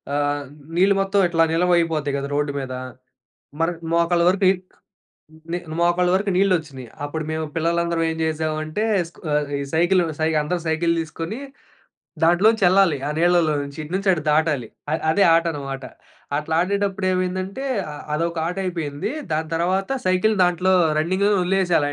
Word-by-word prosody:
ఆహ్, 145 Hz, 0 st, 0 dB, 0.3 s
నీళ్ళు 195 Hz, +2 st, +4 dB
మొత్తం 195 Hz, +1 st, +1 dB
ఇట్లా 165 Hz, -1 st, +3 dB
నిల్వయిపోతాయి 165 Hz, -4 st, +1 dB
కదా 140 Hz, 0 st, -4 dB
రోడ్డు‌మీద. 140 Hz, -3 st, -2 dB, 0.9 s
మర్ 165 Hz, +2 st, +2 dB, 0.2 s
మోకాళ్ళ 170 Hz, 0 st, +2 dB
వరకు 190 Hz, +1 st, +1 dB, 1.1 s
నీల్ 175 Hz, 0 st, -3 dB, 0.2 s
మోకాళ్ళ 175 Hz, +1 st, +2 dB
వరకు 200 Hz, +1 st, 0 dB
నీళ్లొచ్చినియి. 160 Hz, -, 0 dB, 0.2 s
అప్పుడు 155 Hz, +2 st, -4 dB
మేము 160 Hz, 0 st, -2 dB
పిల్లలందరం 170 Hz, 0 st, 0 dB
ఏం 160 Hz, -, -5 dB
చేసామంటే, 155 Hz, +4 st, -2 dB, 0.3 s
స్కు -, -, -21 dB, 0.4 s
ఈ -, -, -3 dB
సైకిలు 175 Hz, +2 st, +3 dB, 0.2 s
సై 160 Hz, -, +2 dB
అందరూ 170 Hz, +3 st, -2 dB
సైకిలు 165 Hz, +1 st, +1 dB
తీసుకొని 165 Hz, +7 st, -6 dB, 0.9 s
దాంట్లోంచి 195 Hz, +6 st, +4 dB
యెల్లాలి 185 Hz, -5 st, +4 dB
ఆ -, -, -2 dB
నీళ్ళలో 175 Hz, -2 st, +3 dB
నుంచి. 140 Hz, +1 st, -9 dB
ఇటు 150 Hz, -, -9 dB
నుంచి 195 Hz, 0 st, 0 dB
అటు 155 Hz, -, -3 dB
దాటాలి. 150 Hz, -6 st, +1 dB, 0.4 s
అదే 200 Hz, +4 st, +3 dB
ఆటనమాట. 140 Hz, -5 st, -2 dB, 0.5 s
అట్లా 155 Hz, +2 st, -2 dB
ఆడేటప్పుడు 195 Hz, 0 st, -1 dB
ఏమైందంటే, 185 Hz, +6 st, -2 dB, 0.3 s
అ -, -, -7 dB, 0.2 s
అదొక 170 Hz, +2 st, -1 dB
ఆటయిపోయింది. 180 Hz, -, -3 dB, 0.2 s
దాని 160 Hz, +1 st, -1 dB
తర్వాత 185 Hz, +3 st, 0 dB, 0.2 s
సైకిలు 185 Hz, +4 st, +2 dB
దాంట్లో 180 Hz, +1 st, +2 dB, 0.3 s
రన్నింగ్‌లో 185 Hz, +6 st, +1 dB
వదిలేసేయాలి 180 Hz, -5 st, +2 dB
170 Hz, 135 wpm, -22 LUFS, 155-185 Hz, 1.1 s, నీళ్ళు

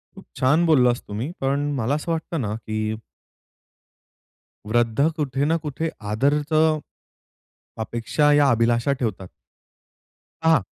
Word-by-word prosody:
खूप -, -, -13 dB
छान 150 Hz, +7 st, +3 dB
बोललास 125 Hz, -7 st, +3 dB
तुम्ही, 110 Hz, +9 st, -4 dB
पण 140 Hz, +2 st, 0 dB
मला 130 Hz, +2 st, 0 dB
असं 155 Hz, +3 st, -3 dB
वाटतं 165 Hz, -1 st, -2 dB
ना 105 Hz, -3 st, -2 dB
की 110 Hz, -1 st, -3 dB, 1.7 s
वृद्ध 120 Hz, +5 st, +2 dB
कुठे 140 Hz, -3 st, -1 dB
ना 165 Hz, +2 st, +2 dB
कुठे 150 Hz, +3 st, -2 dB, 0.2 s
आदरचं 150 Hz, +6 st, +2 dB, 1.0 s
अपेक्षा 120 Hz, +7 st, +1 dB
या 145 Hz, -1 st, +5 dB
अभिलाषा 120 Hz, +3 st, +2 dB
ठेवतात. 100 Hz, -6 st, -3 dB, 1.1 s
हां. 160 Hz, -5 st, +4 dB
135 Hz, 110 wpm, -23 LUFS, 115-150 Hz, 1.7 s, या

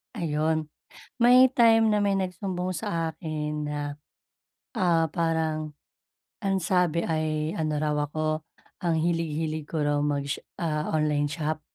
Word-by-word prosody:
Ayun, 155 Hz, -3 st, -1 dB, 0.5 s
may 250 Hz, +2 st, +8 dB
time 225 Hz, -2 st, +5 dB
na 210 Hz, -1 st, +2 dB
may 200 Hz, -1 st, +2 dB
nag-sumbong 185 Hz, 0 st, -3 dB
sa 165 Hz, 0 st, -2 dB
akin 150 Hz, -1 st, -3 dB
na 150 Hz, 0 st, -3 dB, 1.0 s
ah, 170 Hz, -4 st, +3 dB
parang, 160 Hz, -2 st, -1 dB, 0.7 s
ang 195 Hz, -3 st, +1 dB
sabi 175 Hz, -2 st, +1 dB
ay 155 Hz, -1 st, -1 dB
ano 155 Hz, -2 st, -1 dB
raw 150 Hz, 0 st, 0 dB
ako, 155 Hz, +1 st, -1 dB, 0.4 s
ang 170 Hz, -2 st, +1 dB
hilig-hilig 160 Hz, -2 st, -1 dB
ko 155 Hz, -3 st, -1 dB
raw 145 Hz, 0 st, +1 dB
mag 145 Hz, -1 st, 0 dB
sha 140 Hz, -, -3 dB, 0.5 s
online 150 Hz, -2 st, +1 dB
shop. 155 Hz, 0 st, -2 dB
160 Hz, 130 wpm, -27 LUFS, 155-180 Hz, 1.0 s, may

